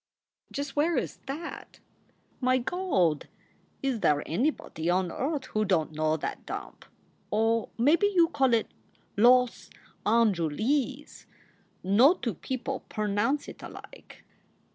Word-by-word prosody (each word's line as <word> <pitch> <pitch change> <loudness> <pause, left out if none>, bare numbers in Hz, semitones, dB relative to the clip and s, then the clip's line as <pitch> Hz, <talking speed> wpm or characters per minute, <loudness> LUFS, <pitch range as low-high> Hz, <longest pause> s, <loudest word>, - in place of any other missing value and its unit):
"Just 280 -1 -4
where 320 +3 +2
is - - -2
that?" 305 +5 -7 0.6
"My 255 0 +3
Gawd! 240 - 0 0.6
Is 265 -4 0
there 150 -6 +2
anybody 175 - -1
on 180 -1 +1
earth 280 -1 -2
who 215 - +2
don 185 -6 +1
t 155 - -15
know 155 0 +1
that - - -5
dump? - - -7 0.4
Or 225 +1 +1
maybe 305 - +4
you 350 -5 +3
call 265 -6 +3
it 225 - -1 0.4
Loss 250 +3 +4 0.3
Anjuleez. 230 - 0 0.6
No 235 - +5
two 235 - -3
people 260 +7 -4
pernounce 215 +7 0
it - - -10
alike." - - -12
240 Hz, 120 wpm, -28 LUFS, 195-285 Hz, 0.6 s, No